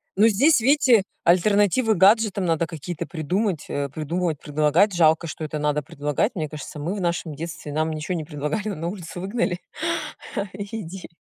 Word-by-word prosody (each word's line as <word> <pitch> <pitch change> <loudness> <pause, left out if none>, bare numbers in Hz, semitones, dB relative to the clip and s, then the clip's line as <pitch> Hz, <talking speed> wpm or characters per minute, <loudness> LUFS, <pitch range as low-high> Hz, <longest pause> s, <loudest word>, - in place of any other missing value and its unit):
Ну 210 +3 +6
здесь, 240 +5 +4
видите, 260 -5 +5 0.2
альтернативы 205 +6 +3
гаджетам 200 0 +4
надо 165 -1 +1
какие-то 165 +1 -6
придумать, 180 +1 -1
э, 140 0 -2
придумывать, 160 +2 -2
предлагать. 155 +7 +2
Жалко, 165 -1 +3
что 155 - -6
это 155 0 -3
надо 150 0 0
предлагать. 145 - -1
Мне 155 -4 -2
кажется, 150 0 -8
мы 170 +7 -2
в 200 - -4
нашем 170 -3 -2
детстве 165 -2 -6
нам 155 +1 0
ничего 160 +3 -3
не 160 - -3
предлагали, 150 +7 -3
но 205 - -3
на 165 +2 -4
улицу 175 -2 -6
выгнали, 195 -2 -1 0.9
и 205 +3 -5
иди. 185 +1 -8
170 Hz, 170 wpm, -24 LUFS, 155-205 Hz, 0.9 s, Ну